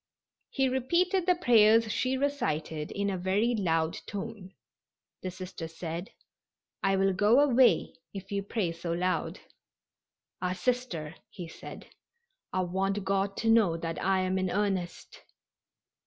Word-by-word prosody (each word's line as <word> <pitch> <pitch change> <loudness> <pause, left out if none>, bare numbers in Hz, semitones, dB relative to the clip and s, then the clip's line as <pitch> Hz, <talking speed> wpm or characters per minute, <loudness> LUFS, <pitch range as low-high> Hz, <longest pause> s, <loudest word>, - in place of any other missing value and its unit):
He 270 -1 +1
repeated 340 +9 +1
the 360 - +5
prayers 225 -7 +5
she 255 +4 0
recited 160 - -2
in 200 0 -1
a 185 - -3
very 200 +6 +1
loud 165 -6 0
tone. 200 -2 -7 0.7
The 185 - -3
Sister 185 -2 -7
said: 165 +2 -6 0.7
"I 195 0 +2
will 195 0 +2
go 210 +7 +4
away 260 -3 +4 0.2
if 195 0 -9
you 200 0 0
pray 195 -3 -2
so 170 0 -4
loud." 180 +2 -1 1.0
"Ah, 180 0 0
Sister," 185 -9 -2 0.2
he 180 -5 -8
said, 165 - -10 0.7
"I 185 - 0
want 195 +2 -1
God 195 0 0
to 225 - -2
know 205 -8 +4
that 165 0 -4
I 190 0 +2
am 185 0 0
in 185 -1 0
earnest." 190 -3 -2
195 Hz, 140 wpm, -29 LUFS, 180-230 Hz, 1.0 s, the